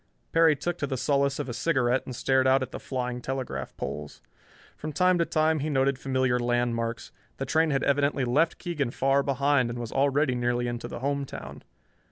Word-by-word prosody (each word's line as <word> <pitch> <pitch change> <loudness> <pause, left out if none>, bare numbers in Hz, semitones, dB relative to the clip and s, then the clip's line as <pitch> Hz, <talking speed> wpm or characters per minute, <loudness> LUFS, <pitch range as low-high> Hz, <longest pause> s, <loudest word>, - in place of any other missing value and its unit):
Perry 165 -2 +5
took 175 +4 -3
to 140 - -1
the 130 -1 -2
solace 140 +2 +1
of 145 - -3
a 120 - -4
cigarette 130 -3 +1
and 130 - -5
stared 130 +1 +2
out 130 0 +4
at 130 - -7
the - - -6
flying 125 -2 -3
telegraph 125 - -4
poles. 75 -1 -6 0.6
From 155 - -6
time 180 +4 +3
to 170 - +3
time 155 0 +1
he 150 +2 -2
noted 135 -1 +1
familiar 130 -2 +1
landmarks. 120 -1 -1 0.3
The 135 - -3
train 160 +4 +2
had 135 -2 0
evidently 140 -1 +1
left 150 +7 +2
Keegan 150 -8 -2
far 135 +3 +2
behind 140 -2 +1
and 120 - -5
was 120 -2 -5
already 140 0 +2
nearly 120 0 0
into 120 0 -4
the - - -7
home 140 +1 -1
town. 135 - -8
135 Hz, 200 wpm, -27 LUFS, 125-145 Hz, 0.6 s, Perry